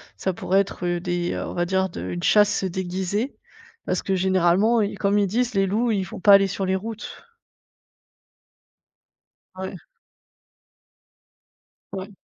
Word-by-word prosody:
ça 190 - -2
pourrait 190 +2 +1
être 185 -2 -5
des, 175 -1 -2
heu, - - -3
on - - -6
va 175 - 0
dire 190 +1 0
de 170 - -7
une 90 -1 -5
chasse 210 -2 +4
déguisée, 190 +6 -2 0.5
parce 185 - -1
que 195 - -1
généralement, 190 +4 +3
heu, 205 0 -1
comme 200 +1 +2
ils 200 - +2
disent: 240 +5 0
«Les 195 -1 +2
loups, 225 +5 0
ils 200 -3 0
vont 185 0 -9
pas 205 - +6
aller 195 0 +6
sur 195 0 -3
les 190 0 +1
routes». 220 - -8 2.3
Ouais. 190 +1 -6 2.2
Ouais. 190 +1 -6
190 Hz, 145 wpm, -23 LUFS, 185-205 Hz, 2.3 s, pas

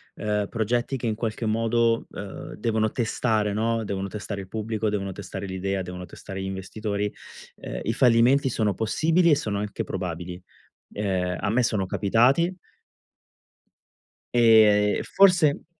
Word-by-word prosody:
ehm, 105 -1 -1
progetti 120 +4 -1
che 120 -2 -3
in 110 - 0
qualche 115 0 -3
modo, 115 +1 +1
uhm, - - -8
devono 110 -1 0
testare, 110 -3 0
no, 115 +1 0
devono 100 0 -3
testare 105 0 -5
il 95 - -11
pubblico, 110 0 -2
devono 100 -2 -3
testare 100 0 -7
l'idea, 95 0 -2
devono 90 0 -7
testare 95 +1 -8
gli - - -4
investitori, 100 +2 -3 0.5
ehm, - - -6
i 115 - -1
fallimenti 125 +3 +4
sono 110 -3 0
possibili 160 - +2
e 150 - +6
sono 105 -7 -2
anche 105 0 -4
probabili, 90 0 -5 0.5
ehm, 95 -3 -1
a 100 - 0
me 120 +3 +2
sono 105 -5 0
capitati 125 - +2 1.8
e 110 -3 +5
e - - -4
forse 180 -7 +4
110 Hz, 145 wpm, -25 LUFS, 100-115 Hz, 1.8 s, e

